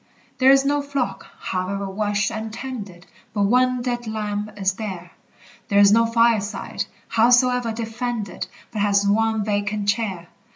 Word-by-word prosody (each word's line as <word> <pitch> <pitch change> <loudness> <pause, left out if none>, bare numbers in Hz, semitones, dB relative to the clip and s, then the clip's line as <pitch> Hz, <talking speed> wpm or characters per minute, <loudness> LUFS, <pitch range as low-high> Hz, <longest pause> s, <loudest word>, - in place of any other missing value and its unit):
There 260 0 +6
is 270 0 +6
no 290 +1 +2
flock, 265 -9 -3
however 195 +2 -3
watched 205 +2 -1
and 220 0 -5
tended, 210 -8 -7 0.3
But 205 - +2
one 250 +3 +2
dead 240 -2 -3
lamb 210 -1 -3
is 195 -1 +1
there! 185 -4 -6 0.6
There 200 - +1
is 200 0 +7
no 230 +2 +5
fireside, 230 -3 +1 0.2
howsoe'er 245 +1 +3
defended, 225 -1 -4 0.2
But 215 - -3
has 200 0 +2
one 220 0 +2
vacant 205 0 -1
chair! 200 -6 -2
215 Hz, 140 wpm, -22 LUFS, 200-240 Hz, 0.6 s, is